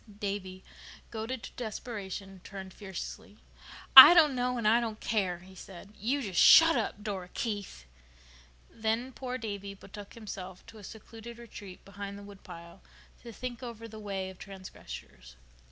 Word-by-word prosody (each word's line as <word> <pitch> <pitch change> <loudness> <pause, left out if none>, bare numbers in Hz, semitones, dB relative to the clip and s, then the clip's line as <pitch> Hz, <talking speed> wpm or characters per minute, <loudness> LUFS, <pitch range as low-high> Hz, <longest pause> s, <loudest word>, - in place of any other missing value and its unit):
Davy, 195 -2 -5 0.5
goaded 225 +2 -5
to - - -8
desperation, 200 -4 -6
turned 190 -2 -9
fiercely. 190 -4 -8 0.6
"I 295 +6 +14
don't 310 -5 +6
know 250 0 -1
and 230 -3 0
I 225 +2 +5
don't 220 -2 -4
care," 190 -5 -1
he 190 +1 -15
said. 190 +2 -12
"You 260 +8 -1
just 195 -5 -1
shut 330 0 +8
up, 205 - -2
Dora 190 -4 -5
Keith." 205 - -4 0.8
Then 225 +3 -2
poor 255 0 -5
Davy 200 -3 -6
betook 200 +1 -12
himself 190 -5 -8
to 225 -1 -13
a - - -13
secluded 225 +2 -11
retreat 205 -5 -11
behind 200 0 -8
the 200 - -11
woodpile 175 -4 -12 0.4
to 235 - -10
think 245 +1 -7
over 230 -2 -8
the 220 -1 -11
way 195 -2 -4
of 185 - -17
transgressors. 185 - -11
205 Hz, 155 wpm, -30 LUFS, 190-230 Hz, 0.8 s, I